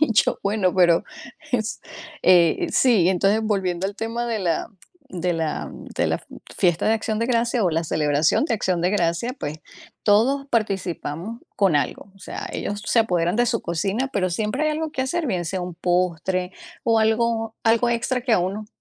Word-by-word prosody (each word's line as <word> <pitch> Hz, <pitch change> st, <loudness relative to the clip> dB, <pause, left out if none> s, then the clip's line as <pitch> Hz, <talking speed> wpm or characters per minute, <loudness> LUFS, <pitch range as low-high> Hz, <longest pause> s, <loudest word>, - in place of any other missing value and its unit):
Y 310 Hz, -, +3 dB
yo, -, -, +3 dB
bueno, 200 Hz, -3 st, +1 dB
pero, 175 Hz, -2 st, +4 dB, 0.5 s
es, 220 Hz, -2 st, -1 dB, 0.4 s
eh, 175 Hz, -3 st, +4 dB
sí, 210 Hz, -9 st, +4 dB
entonces, 195 Hz, +4 st, +2 dB
volviendo 190 Hz, -4 st, 0 dB
al 200 Hz, -, -5 dB
tema 230 Hz, +2 st, -3 dB
de 230 Hz, -2 st, -1 dB
la 170 Hz, -4 st, 0 dB, 0.5 s
de 180 Hz, 0 st, -1 dB
la 160 Hz, -2 st, -2 dB, 0.3 s
de -, -, +2 dB
la -, -, +1 dB
f -, -, -15 dB, 0.3 s
fiesta 175 Hz, -3 st, +2 dB
de 220 Hz, -, +4 dB
acción 220 Hz, -1 st, -1 dB
de 230 Hz, -, 0 dB
gracia 235 Hz, -2 st, +1 dB
o 180 Hz, -, +2 dB
la 165 Hz, +1 st, 0 dB
celebración 150 Hz, -, +2 dB
de 240 Hz, -, 0 dB
acción 185 Hz, -5 st, 0 dB
de 180 Hz, -, +1 dB
gracia, 190 Hz, +6 st, 0 dB
pues, 150 Hz, +2 st, -4 dB, 0.5 s
todos 250 Hz, +7 st, +3 dB
participamos 195 Hz, -, -2 dB, 0.2 s
con 195 Hz, -6 st, +3 dB
algo, 145 Hz, +7 st, -2 dB
o -, -, -20 dB
sea, -, -, -6 dB
ellos 205 Hz, 0 st, -3 dB
se 230 Hz, -, +4 dB
apoderan 175 Hz, -4 st, +1 dB
de 240 Hz, -, +3 dB
su 230 Hz, -1 st, 0 dB
cocina, 195 Hz, +10 st, -1 dB
pero 185 Hz, -2 st, 0 dB
siempre 215 Hz, -, -1 dB
hay 310 Hz, -, +2 dB
algo 310 Hz, 0 st, -3 dB
que 260 Hz, -, -1 dB
hacer, 320 Hz, +5 st, -1 dB
bien 180 Hz, -8 st, -1 dB
sea 185 Hz, +2 st, -3 dB
un 180 Hz, -1 st, -5 dB
postre 180 Hz, +1 st, 0 dB, 0.3 s
o 225 Hz, -1 st, +3 dB
algo 225 Hz, 0 st, +1 dB
algo 230 Hz, +2 st, +3 dB
extra 235 Hz, +2 st, 0 dB
que 245 Hz, -1 st, -1 dB
a 220 Hz, -, +5 dB
uno 195 Hz, +4 st, -2 dB
200 Hz, 190 wpm, -23 LUFS, 175-230 Hz, 0.5 s, a